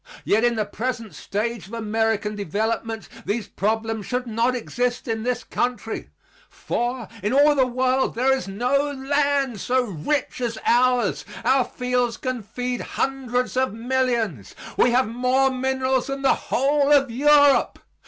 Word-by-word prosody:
Yet 220 +3 +3
in 240 -1 +3
the 215 -1 0
present 230 +1 -4
stage 215 -2 -3
of 215 - -14
American 220 -1 -1
development 220 +4 -2 0.2
these 210 +2 -2
problems 220 0 -2
should 250 0 -2
not 235 +2 0
exist 245 +1 -2
in 225 -1 -2
this 245 +1 -2
country. 240 -2 -3 0.4
For, 240 -1 -3
in 210 +5 -1
all 290 +2 +6
the 265 -3 +3
world 255 +1 +1
there 265 +3 +3
is 260 - -5
no 250 +8 0
land 280 -3 0
so 255 +5 +1
rich 245 - -2
as 230 -2 -2
ours. 245 -3 +2 0.2
Our 260 -1 +4
fields 250 -2 -1
can 255 -3 -3
feed 245 +4 -4
hundreds 250 -2 -2
of 260 -4 0
millions. 235 - -1 0.2
We - - +4
have 250 +1 +3
more 250 +3 +2
minerals 260 0 0
than 275 0 -4
the 270 - +5 0.2
whole 280 +2 +2
of 275 -4 +4
Europe. 285 +2 +4
245 Hz, 150 wpm, -23 LUFS, 225-260 Hz, 0.4 s, all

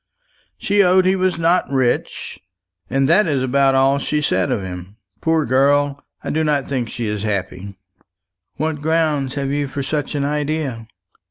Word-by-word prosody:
She 205 0 +2
owned 185 0 +4
he 190 +1 +3
was 185 -2 0
not 170 +2 +2
rich, 130 -8 -1 0.5
and 135 +2 +1
that 185 +5 +4
is 140 -4 0
about 135 +1 +2
all 135 +1 +3
she 150 +2 -1
said 95 -11 0
of 100 - -1
him. 90 +1 -8 0.3
Poor 160 -2 +1
girl, 140 +2 +2 0.2
I - - -3
do 160 +1 0
not 145 -3 0
think 125 -4 -2
she 120 - -4
is 105 -1 -3
happy!" 100 -2 -4 0.8
"What 155 0 -2
ground 155 -4 0
have 140 -1 -2
you 145 0 -1
for 140 +1 -4
such 145 +1 -3
an 140 -1 0
idea?" 145 -5 -2
140 Hz, 170 wpm, -19 LUFS, 130-155 Hz, 0.8 s, owned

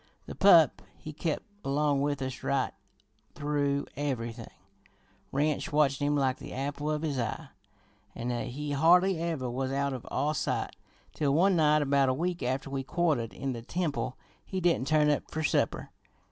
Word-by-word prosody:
The - - -7
pup 175 -5 +6 0.2
he 155 - -8
kep' 155 +1 -2 0.2
along 140 0 +1
with 145 -1 -1
us 130 -1 -5
right 135 -2 0 0.6
through 145 -1 0
everything; 130 -5 -3 0.8
Ranch 150 +2 0
watchin' 145 -1 +2
him 145 - +2
like 135 -2 +1
the - - -9
apple 145 +3 -3
of 155 0 -1
his 145 -4 -1
eye, 130 +5 -3 0.7
an' 120 +1 -3 0.2
he 145 +4 -5
hardly 175 +5 +4
ever 165 -6 -2
was 130 +2 -2
out 140 0 0
of 125 - -7
our 150 +1 0
sight, - - -2 0.4
till 140 -2 +1
one 185 +4 +4
night 150 -2 +4
about 140 -1 +3
a 130 - +1
week 175 +4 -2
after 130 +3 -1
we 135 -1 -1
quartered 140 -5 0
in 135 -1 -4
the 115 - -6
temple 145 -2 -2 0.3
he 190 - -4
didn't 170 -7 +1
turn 150 0 +4
up 145 - -2
fer 160 - -3
supper. - - 0
145 Hz, 170 wpm, -29 LUFS, 135-155 Hz, 0.8 s, pup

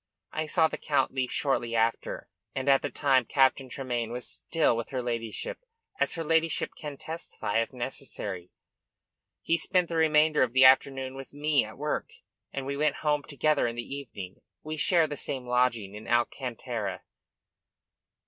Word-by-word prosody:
I 155 0 -2
saw 160 0 +4
the - - -6
Count 140 -4 +1
leave 130 -2 -1
shortly 120 -5 0
after, 115 0 0 0.3
and 130 +1 -3
at 135 -1 +5
the 145 - -2
time 135 -3 +3
Captain 135 +1 +2
Tremayne 120 -3 -3
was 125 +1 -4
still 165 -7 +1
with 115 0 -4
her 130 - -2
ladyship 115 -2 -3 0.4
as - - +1
her 165 - -3
ladyship 160 0 +1
can 145 -2 -7
testify 160 -9 -2
if 115 - -3
necessary. 120 -8 -3 0.9
He 165 - +2
spent 180 +1 +1
the 170 - -3
remainder 155 -1 +4
of 120 -2 +2
the 130 0 +7
afternoon 130 0 +4
with 135 0 -9
me 145 0 +2
at 110 0 -9
work, 150 +2 -2 0.4
and 135 -1 -4
we 140 +1 -2
went 150 +2 +1
home 150 -1 +3
together 145 -1 +1
in 115 - -3
the 120 +3 -5
evening. 100 -9 -8 0.2
We 155 +1 -4
share 165 +1 +3
the 145 -1 -5
same 130 -2 -3
lodging 125 -5 +1
in 105 +1 -9
Alcantara." 120 -1 -1
135 Hz, 165 wpm, -28 LUFS, 120-150 Hz, 0.9 s, the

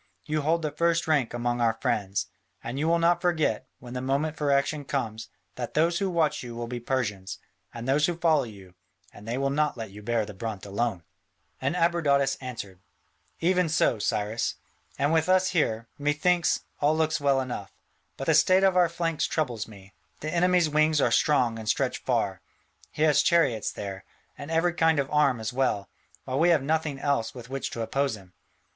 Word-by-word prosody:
You 155 0 -1
hold 165 +3 +1
the 150 - -1
first 170 +2 +1
rank 145 -7 +2
among 120 0 -1
our 115 -1 +2
friends. 100 -1 -1 0.4
And 120 +4 -4
you 155 - 0
will 170 +1 +4
not 170 +1 +3
forget, 160 - 0
when 120 0 -10
the 125 - -3
moment 140 +4 0
for 150 -2 -1
action 140 +2 +1
comes, 115 -6 -3 0.3
that 120 -2 -5
those 170 +2 +2
who 195 -1 0
watch 160 -4 +1
you 120 -2 -7
will 120 0 -4
be 120 +1 -5
Persians, 105 -7 -2 0.3
and 120 +1 -7
those 145 +3 +3
who 175 -2 -2
follow 160 -3 +3
you, 100 -5 -12 0.4
and 105 - -13
they 120 +2 -2
will 135 0 0
not 150 -1 0
let 110 -3 -6
you 105 +2 -11
bear 115 0 0
the 105 - -9
brunt 110 -1 -5
alone." 100 -2 -2 0.6
And 135 +6 0
Abradatas 150 -6 +2
answered: 110 -8 -7 0.6
"Even 180 0 +2
so, 140 -7 +2
Cyrus; 105 +2 -1 0.4
and 145 +3 +1
with 160 +2 +2
us 185 0 +4
here, 115 -10 0
methinks, 150 +4 +2 0.2
all 150 +2 +2
looks 160 -2 +1
well 140 -1 +3
enough: 125 -6 -5 0.5
but - - -4
the - - +3
state 185 +1 +5
of 190 -1 +4
our 175 -2 +4
flanks 165 -1 -1
troubles 120 -9 -2
me: 100 -3 -14 0.3
the 155 +1 -3
enemy's 180 -1 +3
wings 155 0 +3
are - - +2
strong 125 -6 +2
and 110 -1 -4
stretch - - 0
far: - - -1 0.5
he 150 - -1
has 150 -3 +5
chariots 160 -11 +2
there, 95 -1 -6 0.3
and 145 - -9
every 165 +2 +2
kind 165 -2 +3
of 140 -1 -1
arm 140 -5 +3
as 110 +1 -4
well, 125 -6 0 0.4
while 130 +1 -2
we 170 +2 +4
have 160 -5 +3
nothing 155 -1 0
else 140 -5 -1
with 125 0 -10
which 135 0 -3
to 115 - -4
oppose 135 0 -1
him. 95 -2 -17
140 Hz, 195 wpm, -27 LUFS, 115-160 Hz, 0.6 s, state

